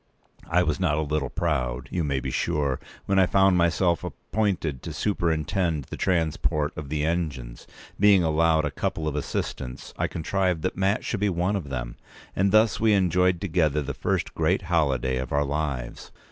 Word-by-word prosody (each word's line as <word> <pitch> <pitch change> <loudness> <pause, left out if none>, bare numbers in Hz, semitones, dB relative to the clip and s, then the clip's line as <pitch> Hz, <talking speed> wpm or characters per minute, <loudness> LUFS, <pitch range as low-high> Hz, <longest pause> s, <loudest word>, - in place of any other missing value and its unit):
I 90 +2 +3
was 75 +1 -1
not 80 -5 +1
a - - +1
little 75 -1 -1
proud, 65 -8 -1
you 85 - -1
may 70 -3 0
be - - -4
sure, 70 -3 0 0.3
when 95 -1 +2
I 95 - +5
found 95 0 +4
myself 85 0 +2
appointed 95 - -2
to 80 - -6
superintend 85 -1 0
the - - -3
transport 75 -3 0
of 75 -3 -7
the 75 0 -1
engines. 75 -8 -3 0.3
Being 100 -2 +6
allowed 80 0 +3
a 75 - -2
couple 80 - -2
of 75 - -2
assistants, 65 -3 -4
I - - +1
contrived 90 0 -1
that 95 - -1
Mat 95 +2 0
should 110 - -2
be 105 0 +2
one 90 +3 0
of 85 -8 -4
them; - - -5 0.4
and 95 +1 +2
thus 110 0 +4
we 110 -1 +4
enjoyed 90 -2 +2
together 80 -6 +1
the 70 +1 -4
first - - -2
great 85 +4 +1
holiday 70 -7 +1
of 65 0 -4
our 70 0 +2
lives. 70 -4 -4
80 Hz, 180 wpm, -25 LUFS, 75-90 Hz, 0.4 s, Being